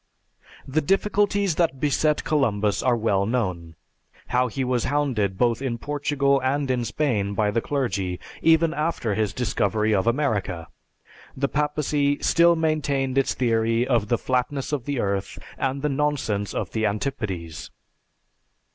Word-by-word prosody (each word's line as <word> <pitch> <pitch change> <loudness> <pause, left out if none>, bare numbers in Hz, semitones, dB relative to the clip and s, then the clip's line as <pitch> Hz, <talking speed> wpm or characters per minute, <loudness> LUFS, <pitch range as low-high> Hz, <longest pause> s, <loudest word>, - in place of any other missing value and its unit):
The 145 +4 +1
difficulties 200 +2 +1
that 160 -6 +1
beset 150 +2 +1
Columbus 105 -9 +1
are 125 -2 +2
well 100 -3 +1
known. 90 -9 -2 0.5
How 125 +1 +2
he 130 +3 -3
was 125 -2 0
hounded 125 -10 0
both 120 +1 +1
in 125 -4 -2
Portugal 140 0 0
and 135 +1 0
in 125 -1 0
Spain 105 -9 -1
by 105 -1 +1
the 115 - 0
clergy; 100 -11 -1
and 90 - -7 0.2
even 165 0 +4
after 150 -8 -1
his 105 -1 0
discovery 110 -1 0
of 100 +2 +1
America, 105 - -1 0.7
the 140 +1 +1
Papacy 150 -1 0
still 170 0 +4
maintained 145 -5 0
its 135 -1 +1
theory 115 0 +1
of 115 -5 +1
the 120 - +2
flatness 130 +3 -1
of 140 -5 -2
the 145 -3 -2
earth 100 -2 -2 0.2
and 135 +1 -2
the - - +2
nonsense 135 -8 -1
of - - -3
the 110 - -2
antipodes. 100 - -4
130 Hz, 145 wpm, -24 LUFS, 105-145 Hz, 0.7 s, even